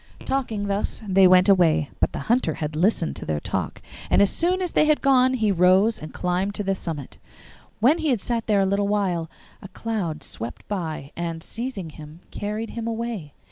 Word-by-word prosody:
Talking 230 -6 -1
thus 200 +1 -2
they 190 -1 +6
went 185 +1 +6
away. 165 -6 +3
But - - +1
the - - -5
Hunter 230 -9 +1
had 150 0 -4
listened 160 - +1
to - - -7
their 75 -1 -1
talk, - - -4 0.3
and - - +4
as 200 - +5
soon 360 +2 +1
as 360 -2 -1
they - - +3
had 305 -1 +3
gone 260 -2 +4
he 220 -4 +1
rose 190 +5 +4
and 155 - -8
climbed 185 +3 -1
to 205 - -2
the 195 0 0
summit. 160 -7 -6 0.6
When 285 +9 +4
he 320 -2 0
had 245 -5 +2
sat 230 +3 -3
there 205 -2 +3
a - - +3
little 200 +1 +1
while 185 -6 0 0.3
a - - -9
cloud 185 -9 -4
swept 115 +2 -7
by, 160 -8 -4
and, 165 -1 -4
seizing 225 -8 -5
him, 155 +2 -12
carried 210 +2 -4
him 230 -1 -5
away. 225 -9 -4
195 Hz, 200 wpm, -24 LUFS, 165-230 Hz, 0.6 s, they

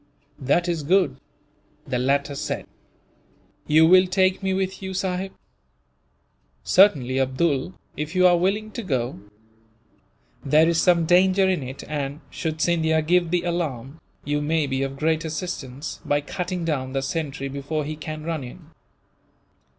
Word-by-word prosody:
"That 155 +7 +1
is 170 -3 -1
good," 170 -3 +2 0.7
the 125 - -2
latter 140 +2 +1
said. 140 - -4 1.0
"You 155 +2 +6
will 185 +2 +6
take 185 +1 +2
me 190 0 -1
with 190 0 -2
you, 190 0 -5
sahib?" 190 0 -2 1.3
"Certainly, 135 - +4
Abdool, 135 +4 0 0.2
if 150 +3 -5
you 185 0 +4
are 180 -1 +6
willing 200 +5 0
to 235 - -5
go. 130 - -2 1.2
There 155 +3 +4
is 170 -1 +2
some 170 -2 +3
danger 185 +3 +4
in 185 -4 +1
it 130 +1 -7
and, 145 0 -4
should 160 -1 -4
Scindia 160 -2 +2
give 175 +1 +2
the 175 0 0
alarm, 160 -5 -3 0.2
you 145 0 0
may 155 +1 +1
be 135 -1 -2
of 135 0 -3
great 160 +2 0
assistance, 150 -4 -5
by 145 - +1
cutting 180 +3 -4
down 130 -5 -2
the 135 -1 -1
sentry 140 -1 -3
before 140 +2 -3
he 155 +1 -4
can 155 0 -7
run 160 -3 -3
in. 125 - -12
160 Hz, 150 wpm, -23 LUFS, 140-180 Hz, 1.3 s, You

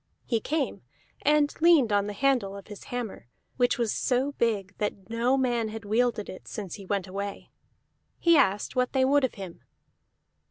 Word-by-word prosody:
He 230 - +1
came, 295 +5 -2 0.4
and 295 0 +3
leaned 315 -10 +5
on 205 0 +2
the 210 - -4
handle 220 -4 +1
of 200 - -12
his 205 - -10
hammer, 240 - -5 0.3
which 245 +2 +2
was 235 -3 0
so 260 +3 +1
big 205 -7 -1
that 205 -1 -3
no 240 +3 +2
man 240 -4 +1
had 220 0 -7
wielded 220 0 +1
it 185 - -10
since 200 -6 -6
he 195 -3 -9
went 200 -2 -1
away. 200 +1 -6 0.7
He 340 -1 +4
asked 205 -7 +2
what 250 0 +1
they 260 -1 +3
would 285 +1 +3
of 260 - 0
him. 190 -5 -8
230 Hz, 175 wpm, -27 LUFS, 200-265 Hz, 0.7 s, leaned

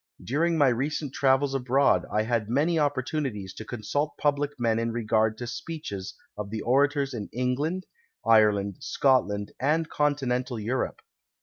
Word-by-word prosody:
During 165 +6 +1
my 145 -3 +5
recent 135 +3 -2
travels 135 0 +2
abroad 135 +1 +2
I 105 +1 +2
had 110 -2 -1
many 155 +7 +2
(opportunities 130 - -1
to - - -8
consult 125 +7 -2
public 145 -1 +1
men 115 -1 +2
in 115 0 -1
regard 110 -1 +1
to 125 - -6
.>!K'cches 120 - -6 0.2
of 105 -1 -5
the 110 0 -4
orators 140 +2 +2
of 105 -4 -5
England, 135 - -1 0.4
Ireland, 105 -3 +4
Scotland 105 -7 +1
and 155 +4 +1
Continental 130 -4 0
Europe. 120 +5 -2
125 Hz, 140 wpm, -27 LUFS, 110-145 Hz, 0.4 s, my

